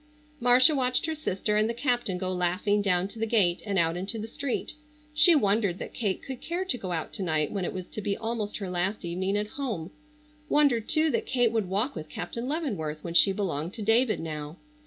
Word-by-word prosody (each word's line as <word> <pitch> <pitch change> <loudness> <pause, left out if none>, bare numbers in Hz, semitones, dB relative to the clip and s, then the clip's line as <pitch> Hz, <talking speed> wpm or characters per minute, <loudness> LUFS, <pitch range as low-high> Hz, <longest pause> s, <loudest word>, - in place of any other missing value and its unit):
Marcia 250 +4 +6
watched 255 -1 +1
her 320 - -1
sister 210 -8 -1
and 215 +1 +2
the 235 - -2
captain 240 -7 0
go 185 0 -2
laughing 185 +4 +1
down 185 -2 +2
to 220 +3 -12
the 225 - 0
gate, 190 -6 +2
and 200 -1 0
out 165 -1 +2
into 195 +6 -2
the 220 0 -5
street. 265 +3 -3 0.4
She 300 +3 +7
wondered 205 - +2
that - - -7
Kate 200 -5 -2
could 265 -2 -7
care 350 +3 -3
to 275 -9 +1
go 185 -3 -5
out 165 -2 -3
to - - -5
night 155 -4 0
when 195 -3 -2
it - - -2
was 185 -1 -6
to 215 - -6
be 200 0 -1
almost 225 -2 -3
her 195 -3 -5
last 185 +2 -1
evening 185 +4 -1
at 210 - 0 0.2
home; 195 -11 -3 0.6
wondered, 270 -7 +3
too, 310 0 +3
that 455 -1 -1
Kate 245 -3 +2
would 220 -5 -1
walk 210 +9 0
with 155 -1 -7
Captain 230 +10 -5
Leavenworth 205 - -3
when 170 - -5
she 195 +3 +6
belonged 180 -4 -2
to 220 - -5
David 225 +2 +3
now. 155 0 -6
205 Hz, 220 wpm, -27 LUFS, 180-245 Hz, 0.6 s, She